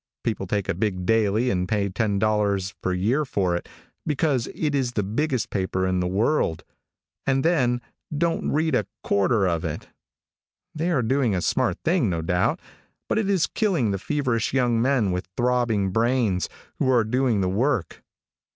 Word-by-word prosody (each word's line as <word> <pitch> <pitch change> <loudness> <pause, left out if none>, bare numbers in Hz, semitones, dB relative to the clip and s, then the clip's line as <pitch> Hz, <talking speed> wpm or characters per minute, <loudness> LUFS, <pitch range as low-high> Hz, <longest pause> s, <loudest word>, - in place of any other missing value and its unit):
People 105 -4 -2
take 100 0 -1
a - - +1
big 95 -1 -2
daily 110 +2 +2
and 90 -1 -1
pay 105 -1 0
$10 100 -1 0
per 95 - -1
year 110 +12 +1
for 95 -10 0
it 85 - -5 0.3
because 145 -4 0
it 150 -2 -1
is 130 -3 0
the 105 - 0
biggest 125 +5 -1
paper 95 -1 -1
in 95 -1 +1
the 90 - 0
world, 100 - +1 0.6
and 135 +1 +2
then 125 -8 +2 0.4
don't 165 +1 0
read 160 +1 +1
a 110 -5 +1 0.2
quarter 100 +1 +2
of 85 -2 -1
it. - - -5 0.8
They 165 +2 -1
are 140 -8 +1
doing 125 -3 +1
a - - 0
smart - - +1
thing, - - +2
no 85 -2 -2
doubt, 90 +2 +1 0.5
but - - +1
it 205 -2 -1
is 190 -5 +3
killing 170 - 0
the 100 - -2
feverish 125 -2 -1
young 120 -3 +2
men 125 -6 +2
with 90 +1 -3
throbbing 120 -5 +1
brains, 115 -4 +1 0.3
who 130 - +2
are 120 -3 +4
doing 120 -1 +1
the 95 - +1
work. 110 - -1
115 Hz, 170 wpm, -24 LUFS, 95-130 Hz, 0.8 s, are